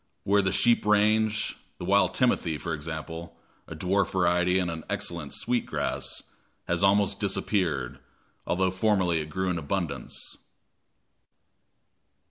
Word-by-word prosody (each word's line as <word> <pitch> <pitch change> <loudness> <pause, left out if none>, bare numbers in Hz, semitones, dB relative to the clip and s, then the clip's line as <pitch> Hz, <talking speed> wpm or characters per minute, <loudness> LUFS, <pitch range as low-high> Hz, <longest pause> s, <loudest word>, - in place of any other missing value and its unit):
Where 100 +1 +3
the 95 -1 0
sheep 120 +4 +3
range, 105 +1 +2 0.2
the - - -6
wild 95 -1 +3
timothy, 90 - +2
for - - -4
example 80 +2 -6 0.3
a - - -7
dwarf 100 +2 +1
variety 90 0 +3
and 90 -2 0
an 80 -1 -6
excellent, 85 -5 -2
sweet 120 0 -1
grass - - -2 0.4
has - - 0
almost 100 +1 +3
disappeared, 90 - -1 0.5
although 95 +1 +1
formerly 95 -4 +2
it 75 - -7
grew 95 +4 -1
in 85 - -1
abundance. 80 -4 -3
95 Hz, 125 wpm, -27 LUFS, 85-100 Hz, 0.5 s, Where